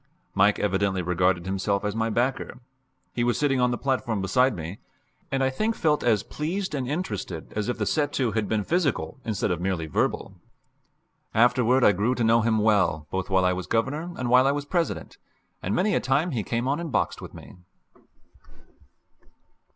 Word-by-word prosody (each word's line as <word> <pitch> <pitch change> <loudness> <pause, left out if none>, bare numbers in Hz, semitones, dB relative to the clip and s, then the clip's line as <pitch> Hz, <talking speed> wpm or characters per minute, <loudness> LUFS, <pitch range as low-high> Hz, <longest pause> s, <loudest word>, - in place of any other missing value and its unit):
Mike 105 +2 +4
evidently 95 -2 0
regarded 90 0 +1
himself 100 +1 -1
as 105 0 -2
my 115 0 0
backer 120 +3 -1 0.6
he 120 - 0
was 120 0 +1
sitting 135 -3 +1
on 125 - +3
the 120 - -1
platform 130 -5 -1
beside 115 +7 +2
me 85 +3 -6 0.5
and 135 0 +1
I 130 - +2
think 215 +11 -1
felt 150 -2 +1
as 110 -3 +2
pleased 180 +5 -3
and 135 -4 -2
interested 105 - -4
as 105 +2 -2
if 125 - -2
the - - -1
set 145 -2 0
to 125 -4 0
had 105 -1 -1
been 110 -2 0
physical 160 - -1
instead 110 -5 -1
of 85 -1 -2
merely 90 -3 -1
verbal. 80 - -1 1.0
Afterward 125 +2 +4
I - - +7
grew 105 +7 0
to 120 - -1
know 115 +1 +4
him 110 0 +2
well 100 -8 +2
both 95 0 -3
while 95 -1 +3
I 90 - +3
was 90 0 -5
Governor 145 +9 -1
and 125 - -2
while 125 +2 +5
I - - +4
was 145 0 -3
President, 170 +2 -2 0.4
and 95 - -1
many 205 +3 +2
a - - +3
time 140 +7 +1
he 120 -6 -1
came 120 +4 -2
on 140 +3 0
and 170 -3 -5
boxed - - -1
with - - -10
me. - - -12
115 Hz, 190 wpm, -25 LUFS, 100-135 Hz, 1.0 s, I